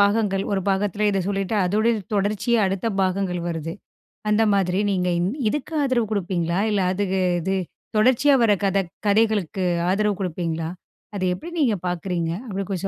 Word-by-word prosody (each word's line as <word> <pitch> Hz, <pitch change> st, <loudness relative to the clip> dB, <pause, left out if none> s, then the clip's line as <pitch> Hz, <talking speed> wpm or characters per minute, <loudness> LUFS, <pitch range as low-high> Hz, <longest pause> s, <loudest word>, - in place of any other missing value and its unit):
பாகங்கள் 200 Hz, -1 st, +2 dB
,ஒரு 195 Hz, -, +1 dB
பாகத்தில 205 Hz, +1 st, +1 dB
இத 195 Hz, -1 st, 0 dB
சொல்லிட்டு 195 Hz, +1 st, -1 dB
அதோடைய 215 Hz, +5 st, +2 dB, 0.2 s
தொடர்ச்சியா 205 Hz, +4 st, +1 dB
அடுத்த 195 Hz, +3 st, -2 dB, 0.2 s
பாகங்கள் 185 Hz, -1 st, 0 dB
வருது. 165 Hz, 0 st, -4 dB, 0.6 s
அந்த 210 Hz, +1 st, +4 dB
மாதிரி 190 Hz, -1 st, +1 dB
நீங்க 180 Hz, -2 st, 0 dB
இன் 180 Hz, +3 st, 0 dB, 0.2 s
இதுக்கு 295 Hz, +5 st, -4 dB
ஆதரவு 250 Hz, -5 st, +1 dB
கொடுப்பீங்களா? 175 Hz, -3 st, -1 dB
இல்ல, 200 Hz, -, +1 dB
அதுக்கு 190 Hz, -1 st, 0 dB, 0.2 s
இது 190 Hz, +3 st, -1 dB, 0.4 s
தொடர்ச்சியா 255 Hz, +6 st, +4 dB
வர 220 Hz, -, +4 dB
கத 195 Hz, 0 st, +2 dB, 0.3 s
கதைகளுக்கு 205 Hz, -3 st, +2 dB, 0.3 s
ஆதரவு 205 Hz, +1 st, +1 dB
கொடுப்பீங்களா? 165 Hz, -2 st, -2 dB, 0.5 s
அத 200 Hz, -, -3 dB
எப்படி 340 Hz, -, -9 dB
நீங்க 230 Hz, -8 st, +2 dB
பார்க்குறீங்க? 175 Hz, -1 st, -2 dB, 0.2 s
அப்படி 195 Hz, -2 st, -3 dB
கொஞ்சம் 195 Hz, 0 st, -2 dB
195 Hz, 150 wpm, -23 LUFS, 180-210 Hz, 0.6 s, அந்த